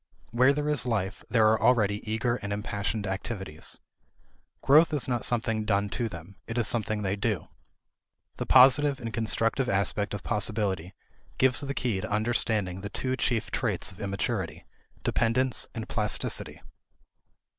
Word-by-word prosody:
Where 125 +4 +5
there 145 +1 -1
is 150 -4 +1
life, 105 -4 -2
there 110 -3 +4
are 110 - +1
already 105 -4 +3
eager 120 +2 0
and 100 -3 -6
impassioned 105 0 -3
activities. 95 -4 -4 0.8
Growth 155 +3 +5
is 145 - 0
not 120 -2 0
something 115 -2 0
done 100 -1 +1
to 115 +4 -2
them; 90 +2 -10
it 115 - -4
is 115 -3 +2
something 110 -2 0
they 95 0 0
do. 105 -1 -2 0.9
The - - -4
positive 135 +2 +6
and 115 -1 -6
constructive 115 +3 0
aspect 100 +1 0
of 100 - -7
possibility 100 -5 -2 0.4
gives 130 0 +3
the 140 -1 -4
key 110 -7 -1
to 110 - -5
understanding 105 -3 0
the 100 - -5
two 130 +4 -2
chief 115 -4 -1
traits - - -1
of 95 - -13
immaturity, 100 -1 -3 0.4
dependence 120 +2 +1
and 115 -1 -5
plasticity. 105 -2 -2
110 Hz, 150 wpm, -28 LUFS, 100-120 Hz, 0.9 s, positive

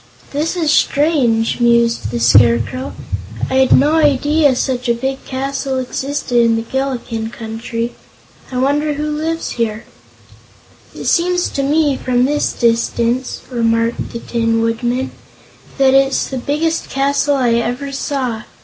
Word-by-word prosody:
"This 310 +5 -1
is 320 -4 +1
strange!" 270 -9 +2
mused 235 - +2
the 120 +1 -3
Scarecrow. 115 - +3 0.6
"I'd 265 0 +3
no 290 +4 +3
idea 290 -1 +3
such 250 -1 -1
a 235 - +3
big 265 +3 -3
castle 270 0 -3
existed 260 0 -2
in 230 -1 +3
this 225 0 -3
Gillikin 250 -4 -2
Country. 230 +1 -5 0.6
I 255 - -3
wonder 290 +3 +1
who 300 +1 -2
lives 325 +2 -2
here?" 220 -1 -1 1.1
"It - - -7
seems 355 +1 +1
to 275 - -2
me, 290 0 +2
from 250 0 +1
this 295 +2 0
distance," 235 +2 0
remarked 230 -1 0
the - - -5
Tin 230 -1 0
Woodman, 240 +3 -1 0.7
"that 270 -1 +4
it's 270 0 +2
the 265 - -3
biggest 310 +5 -1
castle 280 +1 +1
I 250 -4 +2
ever 245 +4 -1
saw. 265 -5 -2
260 Hz, 135 wpm, -17 LUFS, 235-285 Hz, 1.1 s, that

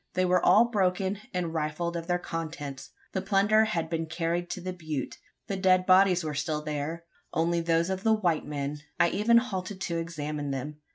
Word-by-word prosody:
They 185 0 +2
were 180 0 +3
all 225 +3 +6
broken, 195 -3 0
and 175 -3 -2
rifled 160 +2 -2
of 165 0 -4
their 175 -1 +2
contents. 150 -6 -6 0.2
The 190 - -2
plunder 205 +3 +3
had 170 -7 -1
been 165 0 -2
carried 170 +2 -2
to - - -4
the 185 +1 -4
butte. 155 -7 -5 0.3
The 195 - -3
dead 185 -1 +3
bodies 185 -1 +5
were 155 -1 -3
still 150 +1 -2
there 155 +2 -4 0.3
only 170 +1 +1
those 165 +2 +1
of 190 0 -2
the 220 +1 +3
white 175 -7 +1
men. 145 0 -3 0.2
I 170 - +5
even 215 +6 +4
halted 195 -5 -2
to 170 -3 -1
examine 150 -3 -4
them. 140 +2 -4
170 Hz, 190 wpm, -28 LUFS, 155-190 Hz, 0.3 s, all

